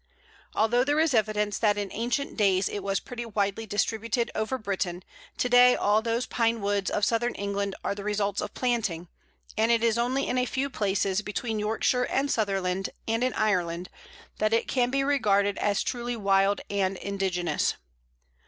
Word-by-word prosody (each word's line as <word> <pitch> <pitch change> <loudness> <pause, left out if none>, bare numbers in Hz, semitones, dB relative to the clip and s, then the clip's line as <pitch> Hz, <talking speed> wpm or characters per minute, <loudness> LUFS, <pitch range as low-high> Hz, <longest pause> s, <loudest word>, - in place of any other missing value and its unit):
Although 235 +3 +3
there 290 +3 +1
is 320 -3 +3
evidence 210 -2 +1
that 210 -2 +2
in 205 -2 -3
ancient 240 +5 -2
days 195 -3 +2
it 205 - -4
was 195 0 -1
pretty 245 -2 -7
widely 210 -1 -2
distributed 225 +3 -1
over 220 +4 -1
Britain, 190 -5 -3 0.3
to - - +1
day 245 0 +6
all 210 +2 +2
those 230 +2 -1
Pine 230 -1 0
woods 200 -1 0
of 205 - +1
Southern 240 +1 0
England 200 -1 -2
are - - 0
the 200 0 -7
results 205 -1 -1
of - - -6
planting, 215 -9 -1 0.5
and 220 +1 +2
it 230 -1 +3
is 230 0 +2
only 255 +3 0
in 255 - 0
a 250 - 0
few 270 +2 -2
places 195 -2 0
between 220 +1 -3
Yorkshire 225 +4 +1
and 275 +1 0
Sutherland, 195 -3 0 0.2
and 225 +2 0
in 255 - 0
Ireland, 180 -4 0 0.5
that 215 +1 +1
it 230 - +2
can 245 -2 +1
be 275 +1 +1
regarded 205 -8 +2
as 205 -1 +1
truly 240 0 -3
wild 195 -1 +2
and 195 -1 -1
indigenous. 185 -5 -1
215 Hz, 175 wpm, -27 LUFS, 200-240 Hz, 0.5 s, day